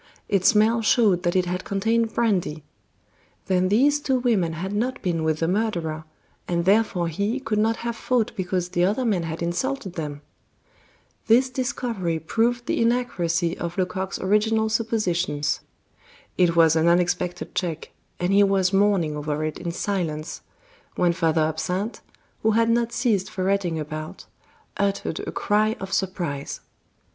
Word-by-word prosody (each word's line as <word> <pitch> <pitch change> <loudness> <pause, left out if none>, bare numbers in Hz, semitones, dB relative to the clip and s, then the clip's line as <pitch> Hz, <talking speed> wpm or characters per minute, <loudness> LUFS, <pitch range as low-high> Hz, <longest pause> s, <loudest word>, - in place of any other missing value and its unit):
Its 195 -3 +2
smell 225 +1 +4
showed 210 -5 +3
that 175 0 0
it 185 -1 +3
had 180 +1 -3
contained 225 +3 0
brandy. 180 -9 0 0.8
Then 185 -1 +2
these 280 +8 +4
two 265 -3 +1
women 215 -10 +1
had 185 +5 -4
not 245 +5 -1
been 170 -4 0
with 155 0 0
the 165 - +2
murderer, 170 -6 -1 0.4
and 170 -1 0
therefore 195 -3 +2
he 200 - -1
could 225 -5 -1
not 225 +1 +2
have 235 -1 -2
fought 240 -1 0
because 185 -1 -2
the 175 0 +1
other 210 +8 +1
men 205 -6 +1
had 165 0 -4
insulted 190 +4 -2
them. 150 -3 -5 1.1
This 250 +3 +4
discovery 235 -9 -2
proved 235 +9 0
the - - 0
inaccuracy 180 -8 0
of 170 +1 -4
Lecoq's 190 +1 -2
original 220 +3 +2
suppositions. 180 -10 0 0.8
It 175 -2 +3
was 165 -1 +5
an 160 +1 +3
unexpected 175 0 0
check, 165 -3 -3 0.3
and 180 +2 0
he 200 - +6
was 195 -1 +2
mourning 195 -6 +2
over 150 0 -2
it 155 - -4
in 170 -1 -3
silence, 170 -4 -3 0.5
when 175 -1 +2
Father 165 -2 +1
Absinthe, 180 +7 -2 0.4
who 220 0 +2
had 230 +1 +3
not 235 0 +1
ceased 215 -7 0
ferreting 185 -3 -1
about, 155 +1 -6 0.5
uttered 200 -4 -1
a - - -3
cry 215 +2 +1
of 195 0 -6
surprise. 175 -7 -2
190 Hz, 150 wpm, -24 LUFS, 170-220 Hz, 1.1 s, he